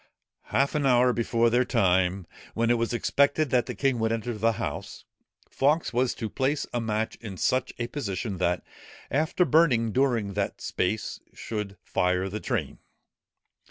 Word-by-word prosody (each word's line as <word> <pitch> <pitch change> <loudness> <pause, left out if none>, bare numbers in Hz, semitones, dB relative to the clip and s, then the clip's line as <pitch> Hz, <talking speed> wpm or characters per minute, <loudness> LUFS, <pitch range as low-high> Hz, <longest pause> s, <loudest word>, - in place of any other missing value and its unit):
Half 135 +6 +1
an 150 -2 0
hour 125 -1 +4
before 115 0 +1
the 125 +2 +4
time, 95 -6 +1 0.3
when 115 +1 +2
it 120 - +3
was 115 - 0
expected 140 +4 +2
that 125 -2 +2
the - - -4
king 135 -3 +1
would 110 0 +1
enter 115 +1 -2
the 115 +1 +1
house, - - -5 0.4
Fawkes 150 +3 +1
was 125 +1 +1
to 110 - -4
place 140 +5 -1
a 120 - 0
match 110 0 -2
in 105 -5 -8
such 130 +7 +1
a 120 - -2
position, 105 -6 -4
that 90 -1 0 0.5
after 160 +6 +2
burning 130 -10 +3
during 120 -5 +1
that 100 0 -2
space, 105 +4 -2 0.2
should 105 -3 -5
fire 90 +1 0
the 105 +3 -4
train. - - -3
115 Hz, 160 wpm, -27 LUFS, 105-130 Hz, 0.5 s, hour